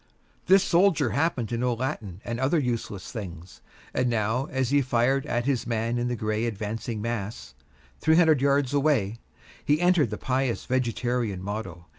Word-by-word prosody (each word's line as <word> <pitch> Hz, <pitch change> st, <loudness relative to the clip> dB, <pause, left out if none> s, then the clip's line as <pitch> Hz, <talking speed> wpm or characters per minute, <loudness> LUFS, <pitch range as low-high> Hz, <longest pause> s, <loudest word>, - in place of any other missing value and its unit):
This 190 Hz, +1 st, +6 dB
soldier 180 Hz, -1 st, +3 dB
happened 140 Hz, -6 st, 0 dB
to 115 Hz, -, -2 dB
know 125 Hz, -1 st, +1 dB
Latin 115 Hz, -, -4 dB
and 120 Hz, 0 st, -3 dB
other 135 Hz, +6 st, +2 dB
useless 120 Hz, -, -3 dB
things, 90 Hz, -7 st, -8 dB, 0.3 s
and 125 Hz, -, +1 dB
now, 115 Hz, +3 st, 0 dB
as 130 Hz, -1 st, -1 dB
he 145 Hz, 0 st, +4 dB
fired 130 Hz, +1 st, +1 dB
at 120 Hz, 0 st, -1 dB
his 130 Hz, -3 st, 0 dB
man 115 Hz, +1 st, -1 dB
in 120 Hz, -, -1 dB
the 125 Hz, -, -1 dB
gray 110 Hz, 0 st, -1 dB
advancing 110 Hz, 0 st, -4 dB
mass 110 Hz, -, -4 dB, 0.5 s
three 160 Hz, 0 st, +3 dB
hundred 160 Hz, -5 st, +5 dB
yards 140 Hz, -1 st, +2 dB
away 135 Hz, -8 st, +1 dB, 0.5 s
he 150 Hz, +1 st, +2 dB
uttered 175 Hz, -, +3 dB
the 105 Hz, -, -4 dB
pious 130 Hz, -2 st, -1 dB
vegetarian 120 Hz, -5 st, -1 dB
motto. 95 Hz, -4 st, -5 dB
120 Hz, 165 wpm, -26 LUFS, 110-140 Hz, 0.5 s, This